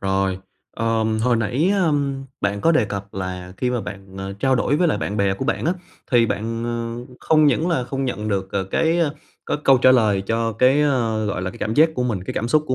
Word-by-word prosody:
rồi. 95 -1 0 0.4
Ờm, 110 -1 0
hồi 120 -1 +3
nãy, 125 - +1
ơ, 185 -6 +2 0.5
bạn 100 0 -1
có 165 - +3
đề 140 -8 +3
cập 100 -1 -6
là 95 -1 -5
khi 125 - -1
mà 125 -2 -1
bạn, 95 -1 -9
ờ, 95 0 -5
trao 130 +7 +1
đổi 130 +3 +1
với 175 +2 +2
lại - - 0
bạn 105 - -3
bè 100 -2 +1
của 130 - -4
bạn - - -1
á, 170 - +2 0.4
thì 120 -2 +4
bạn, 115 +2 -3
ờ, 120 +2 -5
không 155 -1 +4
những 155 +5 +2
là 145 -8 0
không 135 +2 -3
nhận 110 -4 -3
được 95 -2 -1
c 95 -1 -2
cái, 165 +8 +2
ơ, 155 -4 +1 0.3
cái - - 0
câu 135 -1 +6
trả 130 +1 +6
lời 105 -6 +3
cho 115 +1 0
cái, 130 +6 +3
ơ, 115 -7 0
gọi 95 -3 -2
là, 95 - -2
cái - - -13
cảm 110 +1 -2
giác 160 +2 +5
của 125 - -1
mình, 105 -7 -2
cái - - -5
cảm 115 - -2
xúc 155 +4 +3
của 130 - 0
115 Hz, 250 wpm, -21 LUFS, 100-135 Hz, 0.5 s, câu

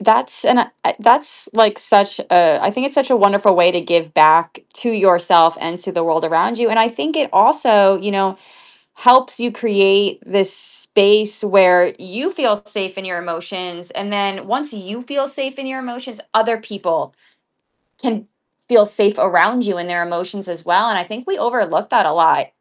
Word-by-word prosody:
that's 220 +2 +1
and - - +3
I - - -2
that's - - +1
like 220 -1 +3
such 200 -1 +2
a 175 -2 +3
I - - 0
think 255 +6 -3
it's 280 - -8
such 270 -2 +1
a 250 - +4
wonderful 200 -2 +3
way 175 0 +4
to 175 -1 -2
give 170 -1 -1
back 160 +2 +4 0.2
to 240 - -4
yourself 175 -5 +3
and 165 +2 -5
to 190 +1 -8
the 170 - -2
world 165 0 -1
around 165 +8 0
you, 235 -1 +1
and 225 0 +2
I 225 - +3
think 305 +7 -5
it 290 -3 -1
also, 200 - +4
you 205 +3 -4
know, 195 -1 -1 0.6
helps 255 +1 +3
you 240 0 -3
create 200 -3 +1
this 195 -1 -1
space 210 +2 0
where 185 -3 +4
you 240 - -6
feel 260 - 0
safe 205 -2 -7
in 195 - -8
your 180 -2 -5
emotions, 175 +1 -8
and 200 +1 -7
then 195 -1 -3
once 270 +6 -4
you 210 +2 -10
feel 275 +2 -4
safe 275 -1 -7
in 270 - -8
your 265 - -7
emotions, 250 -1 -10
other 220 +1 +1
people 195 -6 -5 0.9
can 225 -5 -4 0.4
feel 225 -4 +4
safe 210 0 0
around 215 +6 +2
you 200 -3 -3
in 175 0 -7
their 175 -1 -2
emotions 180 +3 -7
as 170 -1 -9
well, 175 +6 +2
and 220 - -1
I 180 - -2
think 215 +7 -11
we 390 - -3
overlook 240 +1 -2
that - - +3
a - - 0
lot - - +2
200 Hz, 195 wpm, -16 LUFS, 180-235 Hz, 0.9 s, a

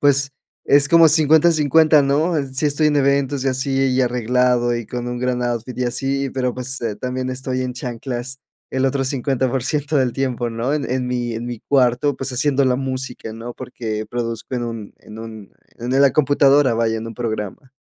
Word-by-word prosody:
pues 140 -1 +2 0.3
es 140 0 +5
como 165 0 +7
50/50, 155 -1 +4
¿no?, 150 +5 +1
eh, 140 -2 -1
sí 135 +3 0
estoy 150 +1 +2
en 150 - +1
eventos 140 -1 +1
y - - +2
así 135 +1 0
y 130 0 +1
arreglado 125 0 +1
y 120 - -4
con 120 0 -5
un 120 0 -4
gran 125 0 -1
outfit 120 0 -3
y 125 - 0
así, 135 +3 -1
pero 125 -1 -1
pues, 130 +1 -4
eh, 115 -3 -2
también 130 0 -3
estoy 130 0 -3
en 125 - -3
chanclas 125 +1 -5 0.3
el 130 0 -1
otro 135 0 +1
50% 135 +2 -1
del 130 -3 +2
tiempo, 125 -3 -2
¿no?, 115 +5 -1
en 145 -4 -3
en 125 0 -1
mi 120 -1 -2
en 115 +1 -5
mi 120 -2 -6
cuarto, 130 +1 +2
pues 135 0 -3
haciendo 140 +1 +2
la 125 -1 +2
música, 130 -3 -5
¿no?, 115 +2 -8
porque 110 -3 -5
produzco 115 +1 -4
en 120 - -2
un 115 -3 -7
en 110 +1 -12
un 110 -3 -10 0.3
en 120 +2 -4
el 135 - +4
la 140 -2 +5
computadora 145 -3 +4
vaya, 115 -1 0
en 110 - -6
un 115 - -8
programa. 110 +2 -5
130 Hz, 200 wpm, -20 LUFS, 120-140 Hz, 0.3 s, como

